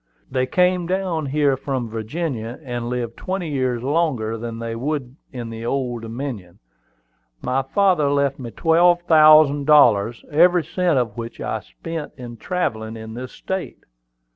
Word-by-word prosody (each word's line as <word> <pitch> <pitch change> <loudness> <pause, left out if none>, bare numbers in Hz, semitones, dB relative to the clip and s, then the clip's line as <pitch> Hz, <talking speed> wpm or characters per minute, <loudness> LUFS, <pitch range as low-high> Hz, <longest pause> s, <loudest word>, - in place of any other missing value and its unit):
"They 130 -1 0
came 180 +3 +2
down 180 -5 -1
here 140 0 +2
from 130 -2 -3
Virginia, 115 +1 -4
and 120 -3 -4
lived 120 -2 -3
twenty 185 -3 -3
years 130 -4 -1
longer 135 -7 0
than 115 0 -6
they 115 0 -4
would 135 0 -3 0.2
in 120 -3 -6
the 115 0 -7
Old 120 -1 -2
Dominion. 115 -6 -6 0.9
My 130 +2 +1
father 175 0 +2
left 140 -1 +1
me 120 -3 -6
twelve 175 +5 +3
thousand 155 -3 +6
dollars, 120 -7 +4
every 175 +3 +5
cent 180 -4 0
of 120 -4 -1
which 115 0 -7
I - - -2
spent 150 - -7
in 120 -2 -9
travelling 110 - -3
in 110 0 -8
this 125 +2 -7
state. 190 -1 -5
135 Hz, 150 wpm, -21 LUFS, 115-160 Hz, 0.9 s, thousand